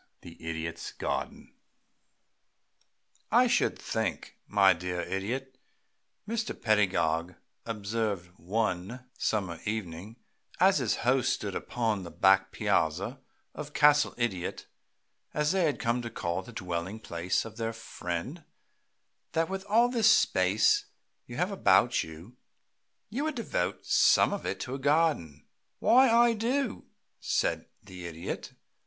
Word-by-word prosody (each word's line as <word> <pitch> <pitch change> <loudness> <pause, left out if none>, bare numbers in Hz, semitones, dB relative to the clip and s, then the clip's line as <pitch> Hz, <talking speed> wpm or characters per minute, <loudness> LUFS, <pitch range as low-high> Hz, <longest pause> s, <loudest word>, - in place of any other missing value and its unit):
VI - - -9
THE 80 0 -8
IDIOT'S 80 +1 -4
GARDEN - - -4 1.8
"I - - +6
should - - +2
think, - - -3
my 100 -2 +5
dear 90 +1 -4
Idiot," 125 +9 -4 0.7
Mr. 230 +1 -3
Pedagog 90 -6 +1 0.3
observed 105 -4 -2
one 105 +5 -2
summer 95 -6 -1
evening, 105 -1 -4 0.4
as - - +5
his - - +1
host - - +3
stood - - -3
upon 110 -4 -1
the 85 - -7
back 95 +2 +3
piazza 100 - 0 0.3
of 150 0 -8
"Castle 150 0 +5
Idiot," 95 -7 -2 0.7
as 150 0 +2
they 190 -2 +2
had 150 - 0
come 120 +1 0
to 120 - -5
call 85 -4 -3
the 125 - -12
dwelling 90 0 -4
place 90 -2 -2
of 110 0 -10
their 115 -1 -2
friend, 115 - -5 0.9
"that 165 +1 +1
with 190 0 -4
all 230 +4 +4
this 230 -3 +3
space 415 - +3 0.4
you 120 - -8
have 180 +5 0
about 120 - +3
you, 85 +10 -12 0.7
you 265 +7 -2
would 310 -1 -2
devote 230 - -2
some - - +4
of 200 - -4
it - - -3
to 130 - -4
a 135 - -4
garden." 140 - +1 0.3
"Why, 260 +2 +5
I 235 +1 +5
do," 240 +3 -1 0.3
said - - 0 0.2
the 90 -2 -8
Idiot. 80 0 -6
110 Hz, 130 wpm, -29 LUFS, 90-150 Hz, 1.8 s, I